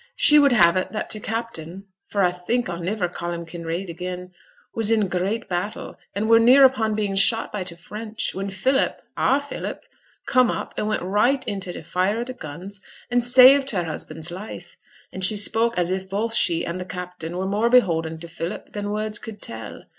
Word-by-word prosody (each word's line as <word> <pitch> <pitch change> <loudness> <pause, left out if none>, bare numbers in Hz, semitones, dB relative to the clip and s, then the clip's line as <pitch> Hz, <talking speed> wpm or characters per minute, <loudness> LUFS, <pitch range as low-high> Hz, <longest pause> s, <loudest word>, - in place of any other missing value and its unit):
She 300 0 +6
would 285 -1 +5
have 175 -6 +5
it 185 - -2
that 215 - -4
t' 215 - -1
captain 200 -5 -5 0.2
for 200 -1 +1
I 180 - +3
think 225 +8 -2
I'll 170 -1 -5
niver 185 +1 -1
ca' 175 0 -5
him 170 0 -6
Kinraid 170 +2 -5
again 180 +1 -6 0.4
was 225 -2 +3
in 225 -2 +3
a - - 0
great 185 +5 -2
battle, 185 +4 -4 0.2
and 210 +2 -1
were 230 0 +6
near 255 +4 +7
upon 225 -5 +2
being 205 -2 -1
shot 195 +4 +1
by 205 -3 -3
t' 175 -2 -3
French, 215 +5 -5
when 195 +1 -4
Philip 255 +9 0 0.2
our 270 - +2
Philip 285 0 -6 0.4
come 255 -1 +3
up - - -4
and 210 - -2
went 215 - -1
right 210 +9 +1
into 195 -3 -4
t' - - -8
fire 185 +4 0
o' - - -1
t' 255 +1 -7
guns, 190 +2 -9 0.3
and 245 0 +2
saved 260 +3 +7
her 185 -7 0
husband's 160 0 -5
life. 190 +5 -9 0.4
And 190 - -4
she 200 +3 +6
spoke 225 +2 +2
as 175 0 +1
if 190 0 -3
both 215 +4 -2
she 170 -7 +2
and 170 +2 -4
t' 180 - -5
captain 180 -2 -7
were 190 - -2
more 210 +4 +1
beholden 165 -10 +2
to 170 - -6
Philip 165 +3 -6
than 205 -1 -4
words 215 0 -3
could 220 -2 -9
tell. 115 - -7
200 Hz, 205 wpm, -23 LUFS, 180-225 Hz, 0.4 s, near